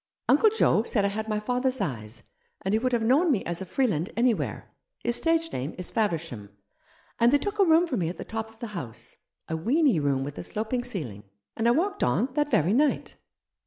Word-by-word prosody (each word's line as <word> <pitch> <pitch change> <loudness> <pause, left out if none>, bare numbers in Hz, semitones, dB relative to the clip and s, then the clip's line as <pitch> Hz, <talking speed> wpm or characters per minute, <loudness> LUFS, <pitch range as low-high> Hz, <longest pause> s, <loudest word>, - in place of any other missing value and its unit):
Uncle 440 - +5
Joe 425 - +3
said 215 -3 0
I - - +2
had 220 +2 -4
my 210 -1 0
father's 250 +3 0
eyes, 110 -5 -5 0.4
and 190 - 0
he 220 - +3
would 255 +2 0
have 235 -2 +1
known 290 +9 +4
me 220 -8 0
as 170 +1 -4
a 190 - -5
Freeland 190 - 0
anywhere 240 -1 0
— - - -41
his 240 0 +1
stage 330 +2 +1
name 135 +5 -4
is 180 - -4
Faversham 165 - -2 0.4
— - - -33
and 235 +1 +5
they 290 - +5
took 410 +7 -4
a 395 - +6
room 330 +1 +5
for 285 -8 -2
me 170 -4 0
at 175 - -7
the - - -7
top 225 0 -4
of 225 - -20
the 235 0 -6
house 130 - -7
— - - -59
a 160 - -2
weeny 240 - +2
room 140 -2 0
with 145 +1 -6
a - - -5
sloping 225 +3 -3
ceiling, 140 - -6 0.3
and 225 - 0
I - - +6
walked 390 +10 0
on 255 - +1
that 295 0 +1
very 180 - +2
night." 290 +4 +1
225 Hz, 235 wpm, -27 LUFS, 170-270 Hz, 0.4 s, a